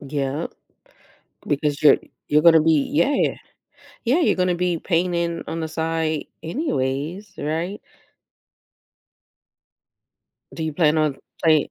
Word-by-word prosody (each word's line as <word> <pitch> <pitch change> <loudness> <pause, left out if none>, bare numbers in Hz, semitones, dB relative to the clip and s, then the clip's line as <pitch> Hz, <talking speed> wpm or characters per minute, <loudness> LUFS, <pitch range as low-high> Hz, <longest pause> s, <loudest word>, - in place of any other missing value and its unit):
Yep, 140 +2 -3 1.0
because 145 0 -1
you're 150 - +7 0.3
you're 150 +1 +4
gonna 165 -1 +7
be 155 -3 +2
yeah. 170 - +2 0.7
Yeah, 265 +9 +3
you're - - +3
gonna 180 -1 +1
be 175 -1 0
painting 170 -1 0
on 165 - -4
the 160 - -3
side 160 -1 -2 0.2
anyways, 170 - -2
right? 165 +7 -3 2.7
Do 160 - -5
you 160 - -2
plan 155 0 +3
on 150 -3 +1 0.3
play 155 -3 +3
160 Hz, 115 wpm, -22 LUFS, 150-175 Hz, 2.7 s, you're